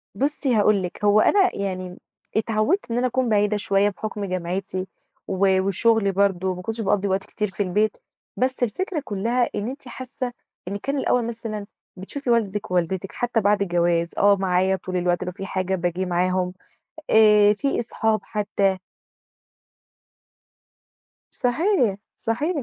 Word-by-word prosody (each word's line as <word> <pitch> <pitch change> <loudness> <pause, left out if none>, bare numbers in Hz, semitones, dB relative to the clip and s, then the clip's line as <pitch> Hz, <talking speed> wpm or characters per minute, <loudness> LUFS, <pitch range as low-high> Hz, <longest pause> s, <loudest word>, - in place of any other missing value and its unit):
بُصّي 275 +2 +1
هاقول 205 -2 +3
لِك 180 +3 -7
هو 205 +1 +5
أنا 380 - +3
يعني 185 -2 -4 0.4
اتعودت 225 - 0
إن 230 - 0
أنا 250 +1 +2
أكون 255 0 0
بعيدة 210 0 +2
شوية 200 0 +2
بحُكم 205 +1 -5
جامعتي 185 +1 -3 0.4
و 190 0 +2
وشغلي 200 +2 +3
برضه، 190 -1 +1
ما 180 - -7
كنتش 225 +4 -3
باقضي 200 -1 +1
وقت 190 0 0
كتير 210 - -3
في 195 +1 -2
البيت. 210 +4 0 0.4
بس 255 0 0
الفكرة 315 - -2
كلّها 230 +5 0
إن 210 +2 -2
أنتِ 265 0 -7
حاسة 255 0 -5 0.4
إن 200 - -3
كان 275 +8 -2
الأول 250 -3 +1
مثلًا 225 -3 -5 0.3
بتشوفي 250 +8 -5
والدِك 210 -4 0
ووالدتِك 180 +2 -1
حتى 240 -2 -1
بعد 205 0 +2
الجواز، 175 -2 +1
آه 200 0 +5
معايا 190 0 +1
طول 185 0 -4
الوقت 175 0 0
لو 180 - -4
في 195 +1 -7
حاجة 190 0 -1
باجي 175 +1 -1
معاهم، 180 +1 0 0.6
آآ 210 -1 +6
فيه 275 +7 -1
أصحاب 220 -2 0
حتى. 200 -2 0 2.5
صحيح، 250 - +1 0.2
صحيح. 290 +7 -1
205 Hz, 145 wpm, -23 LUFS, 190-230 Hz, 2.5 s, آآ